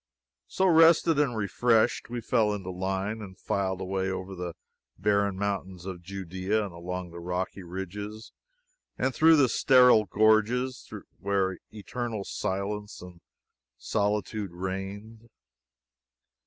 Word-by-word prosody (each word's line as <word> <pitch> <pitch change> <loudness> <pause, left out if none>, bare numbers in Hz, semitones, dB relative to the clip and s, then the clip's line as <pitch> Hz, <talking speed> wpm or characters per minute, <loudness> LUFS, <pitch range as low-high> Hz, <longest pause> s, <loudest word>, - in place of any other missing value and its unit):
So, 190 - 0
rested 165 -2 +5
and 130 -6 +1
refreshed, 115 +3 +2
we 120 0 -4
fell 110 -3 +2
into 95 -2 -6
line 95 +4 -2
and 95 -3 -10
filed 95 -1 -2
away 95 0 -1
over 95 0 -5
the 90 -2 -5 0.4
barren 100 0 +1
mountains 95 -3 -3
of 95 -2 -6
Judea, 95 +3 -2
and 95 - -8
along 90 +1 -5
rocky 90 +3 -4
ridges 100 +5 -7 0.7
and 130 +1 0
through 155 -3 +6
sterile 125 -3 +5
gorges, 110 +5 +2 0.3
where 95 -2 0
eternal 110 +1 -5
silence 105 +2 -4
and 90 -1 -12 0.6
solitude 105 -2 -1
reigned. 100 +5 -6
100 Hz, 115 wpm, -28 LUFS, 95-110 Hz, 0.7 s, through